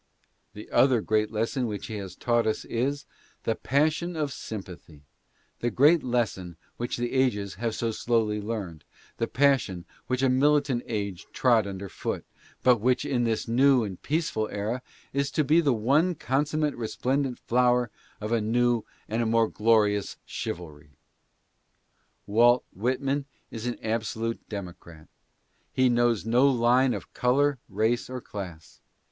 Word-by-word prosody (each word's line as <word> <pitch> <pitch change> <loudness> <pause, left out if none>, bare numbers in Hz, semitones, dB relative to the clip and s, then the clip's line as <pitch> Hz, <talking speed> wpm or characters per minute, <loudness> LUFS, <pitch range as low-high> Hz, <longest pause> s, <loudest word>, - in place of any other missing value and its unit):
The 105 - -9
other 130 -3 +4
great 110 0 +1
lesson 115 +3 -1
which 105 -2 -5
he 110 - -5
has 95 -3 -7
taught 120 -1 +1
us 110 - -1
is, 140 +5 -2 0.4
the 115 - +1
passion 155 +8 0
of 150 -4 -2
sympathy 90 -10 -9 0.3
— - - -40
the 120 - 0
great 145 +8 +5
lesson 105 -9 -2 0.2
which 120 - -3
the 120 +1 -2
ages 110 -7 +1
have 115 -2 -1
so 115 -1 -1
slowly 110 -2 0
learned 100 -8 -5 0.2
— - - -28
the 115 - 0
passion 125 -11 +1 0.2
which 130 +1 0
a - - +5
militant 140 -1 +3
age 100 -5 -4
trod 115 -5 +3
under 100 0 -6
foot, - - -4 0.4
but 125 -1 +6
which 125 +3 +1
in 120 -2 0
this 115 0 -1
new 130 +1 +4
and 95 -4 -6
peaceful 150 -9 -1
era 110 +5 -3 0.3
is 140 0 0
to 155 +2 +1
be 155 +4 +4
the 145 -4 +2
one 140 +10 +2
consummate 150 +2 0
resplendent 130 +3 -1
flower 125 -1 +2 0.3
of 105 +1 -4
a 115 -1 +2
new 120 +1 +2 0.2
and 115 +2 0
more 115 -1 +3
glorious 105 -2 +2
chivalry. 75 -4 -7 1.3
Walt 120 +4 +4
Whitman 135 +6 -1 0.3
is 115 +1 -5
an 120 - -2
absolute 115 +1 -3
democrat. 90 -5 -9 0.6
He 130 -1 +3
knows 120 -3 +2
no 125 +5 +4
line 125 +1 +3
of - - -9
color, 135 +2 +2
race 110 +5 0
or 130 0 -4
class. 90 -9 -9
120 Hz, 150 wpm, -27 LUFS, 105-130 Hz, 1.3 s, but